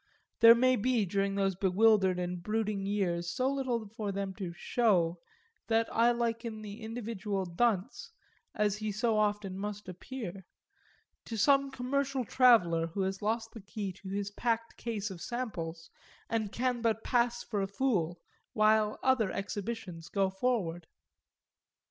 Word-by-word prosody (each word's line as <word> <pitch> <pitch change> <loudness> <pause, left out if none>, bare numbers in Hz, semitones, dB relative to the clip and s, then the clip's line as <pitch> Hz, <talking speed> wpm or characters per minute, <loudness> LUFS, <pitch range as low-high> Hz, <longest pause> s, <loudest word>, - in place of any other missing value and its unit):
There 230 0 +10
may 255 +1 +4
be 235 -1 +1
during 195 +1 0
those 195 -1 +1
bewildered 190 0 +3
and 180 0 -3
brooding 210 -1 -1
years 175 -4 0
so 260 +1 0
little 250 -5 -1
for 210 -1 -4
them 195 0 -3
to 185 -3 -5
"show" 175 -3 +1 0.5
that 225 0 +2
I 230 +1 +5
liken 230 -2 -2
the 205 +1 -8
individual 220 -4 -3
dunce 220 - 0 0.5
as 210 -1 +1
he 215 0 -3
so 225 +2 +1
often 205 -2 0
must 210 0 -5
appear 190 -1 -7 0.8
to 225 - -5
some 275 +5 +4
commercial 265 0 -1
traveller 180 -11 +4
who 180 +4 -4
has 195 +1 -2
lost 225 +2 -1
the 225 - -10
key 195 -1 -5
to 190 +1 -10
his 200 +1 -3
packed 230 +1 -1
case 220 -3 -4
of 175 -3 -9
samples 170 -10 -5 0.4
and 220 -3 -1
can 250 0 -1
but 225 -1 0
pass 240 -1 +1
for 210 -4 -2
a 195 - -1
fool 195 -6 0 0.3
while 215 0 +3
other 260 -6 +3
exhibitions 195 -4 -5
go 195 -2 +1
forward. 190 -6 -1
210 Hz, 150 wpm, -31 LUFS, 195-235 Hz, 0.8 s, There